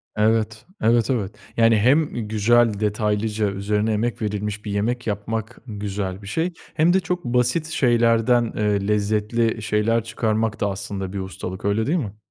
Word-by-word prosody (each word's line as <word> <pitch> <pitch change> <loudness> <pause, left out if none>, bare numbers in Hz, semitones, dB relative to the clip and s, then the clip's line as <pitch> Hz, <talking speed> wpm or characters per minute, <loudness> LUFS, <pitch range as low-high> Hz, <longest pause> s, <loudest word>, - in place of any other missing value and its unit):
Evet, 110 0 +1 0.2
evet, 115 -1 +3
evet. 110 -8 -1 0.2
Yani, 115 -1 +5
hem 135 +9 +4 0.2
güzel, 115 +2 +3
detaylıca 105 0 0
üzerine 105 +2 0
emek 120 +3 -1
verilmiş 105 0 -3
bir 105 - -3
yemek 115 +5 -1
yapmak 110 +1 -3
güzel 100 -3 -4
bir 100 - -10
şey 165 - -1 0.2
hem 165 +3 +3
de 190 - +4
çok 180 -1 -3
basit 125 +6 +1
şeylerden, 120 -4 +2
eee, 105 -2 +1
lezzetli 105 +2 0
şeyler 110 +2 +1
çıkarmak 110 -1 -1
da 105 - +1
aslında 95 -1 -5
bir 100 - -3
ustalık, 95 0 -6
öyle 105 +2 +1
değil 165 +5 +2
mi? 105 - -4
110 Hz, 155 wpm, -22 LUFS, 105-120 Hz, 0.2 s, Yani